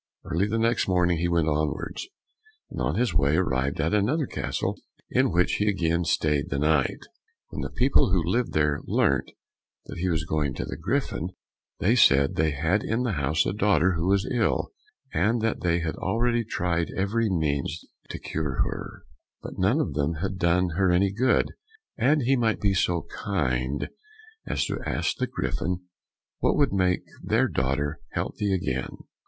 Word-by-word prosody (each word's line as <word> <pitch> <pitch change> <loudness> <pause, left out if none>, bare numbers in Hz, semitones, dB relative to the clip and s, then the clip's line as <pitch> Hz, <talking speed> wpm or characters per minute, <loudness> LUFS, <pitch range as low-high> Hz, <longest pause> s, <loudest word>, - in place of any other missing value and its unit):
Early 90 +5 0
the 110 +2 -1
next 115 +1 +1
morning 90 -2 +2
he 85 - +1
went 85 -2 +1
onwards, 75 - -2 0.6
and - - -5
on - - 0
his 120 -6 +1
way 70 0 +3
arrived 70 -6 0
at 80 +4 +1
another 125 +10 +2
castle - - -3 0.3
in - - +3
which 90 +1 +2
he 105 - 0
again 85 -3 0
stayed 75 -2 +1
the 70 - -1
night. 75 -1 +2 0.5
When - - -5
the - - -3
people 125 -6 +3
who 90 -3 +2
lived 115 +9 0
there 75 -1 +1
learnt 70 -1 +1 0.6
that - - -8
he 90 +1 0
was 80 -2 0
going 75 -4 -1
to - - -3
the - - -5
Griffin, 90 - -2 0.5
they 105 +6 +2
said 70 - +5
they 80 0 +2
had 80 +8 0
in 115 +3 -1
the 120 - 0
house 75 -2 +1
a - - -1
daughter 95 -4 +3
who 85 0 -1
was 100 0 +2
ill, 110 -5 +1 0.4
and 105 +9 +2
that 115 - 0
they 85 -1 +1
had 80 -1 -2
already 120 0 +1
tried 85 -5 -1
every 110 +4 +1
means 80 -2 -1 0.2
to - - -5
cure 75 -5 -2
her, - - -6 0.4
but - - -8
none 100 +11 +3
of 80 - -1
them 75 +3 0
had 95 +4 -4
done 90 +1 +2
her 95 -1 +3
any 95 +2 +3
good, 125 +4 +2 0.4
and 140 +5 +2
he 135 +3 +3
might 115 -3 +1
be 100 -1 +2
so 85 -3 +1 0.2
kind 70 - -1 0.6
as - - 0
to - - -3
ask - - -1
the 130 - -1
Griffin 90 -7 -2 0.6
what - - +2
would 145 -6 +2
make 90 -2 +1 0.2
their - - +2
daughter 70 +4 -1
healthy 105 -2 -2
again? 65 -9 -2
90 Hz, 175 wpm, -26 LUFS, 75-105 Hz, 0.6 s, said